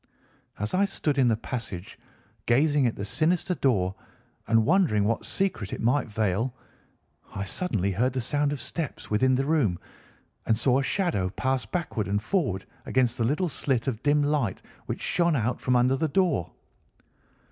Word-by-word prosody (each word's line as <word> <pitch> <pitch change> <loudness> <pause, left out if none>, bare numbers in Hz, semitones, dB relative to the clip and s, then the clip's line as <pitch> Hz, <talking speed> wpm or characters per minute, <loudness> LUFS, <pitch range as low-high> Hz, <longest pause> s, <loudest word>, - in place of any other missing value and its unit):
As 105 +1 -3
I 190 +2 +3
stood 150 -7 -1
in 130 - +5
the 115 - +3
passage 115 -4 -6 0.5
gazing 145 +2 +3
at 115 - -2
the 100 - -5
sinister 170 - +1
door 100 - +1 0.5
and 115 -1 +3
wondering 160 - +3
what 110 +3 -1
secret 185 - -2
it - - -4
might 125 +5 +1
veil, 110 +3 -1 0.8
I 100 - -2
suddenly 100 - -1
heard 125 +7 +1
the 130 - -1
sound 145 +4 +1
of 145 - -3
steps 155 0 -5
within 130 +5 +3
the 135 +1 0
room 140 - +2 0.7
and 110 - +3
saw 125 +3 +3
a - - 0
shadow 135 - 0
pass 130 +2 -1
backward 115 - -2
and 100 +1 +1
forward 105 - -1 0.2
against 125 -2 +2
the - - +2
little 150 +10 +1
slit 130 -6 -1
of 115 -5 -2
dim 145 0 +3
light 145 -9 0 0.2
which - - -4
shone 170 -2 +2
out 120 -1 -1
from 125 - +1
under 125 +2 +4
the 160 +4 0
door. 155 - +1
130 Hz, 170 wpm, -26 LUFS, 110-150 Hz, 0.8 s, in